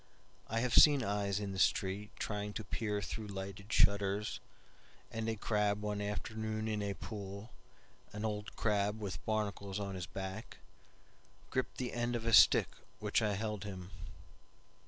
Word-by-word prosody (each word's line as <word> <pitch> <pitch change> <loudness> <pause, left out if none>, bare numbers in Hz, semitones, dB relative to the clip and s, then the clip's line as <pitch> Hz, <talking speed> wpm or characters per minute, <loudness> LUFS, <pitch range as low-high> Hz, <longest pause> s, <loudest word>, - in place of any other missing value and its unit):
I 115 +1 0
have 125 -1 0
seen 145 -4 +8
eyes 100 -1 0
in 100 -1 -3
the 95 - -4
streetTrying 105 +2 0
to 110 - -3
peer 105 0 -2
through 110 +3 -5
lighted 100 +1 -6
shutters, 100 +1 +3 0.7
And 115 0 -2
a 110 - 0
crab 105 -1 +1
one 105 -1 -1
afternoon 110 +1 -3
in 105 -1 -1
a 100 -1 -2
pool, 100 +2 -7 0.6
An 105 +1 -4
old 105 -1 -3
crab 105 0 +1
with 95 -4 -5
barnacles 100 -2 -1
on 100 -1 -3
his 90 -1 -4
back, 95 +3 -6 0.9
Gripped 130 - -1
the 125 -1 -3
end 120 0 0
of 115 -1 -3
a 115 - +1
stick 95 - +8 0.3
which 105 +2 +1
I 105 -2 +1
held 105 0 -3
him. 95 -2 -7
105 Hz, 155 wpm, -35 LUFS, 100-110 Hz, 0.9 s, seen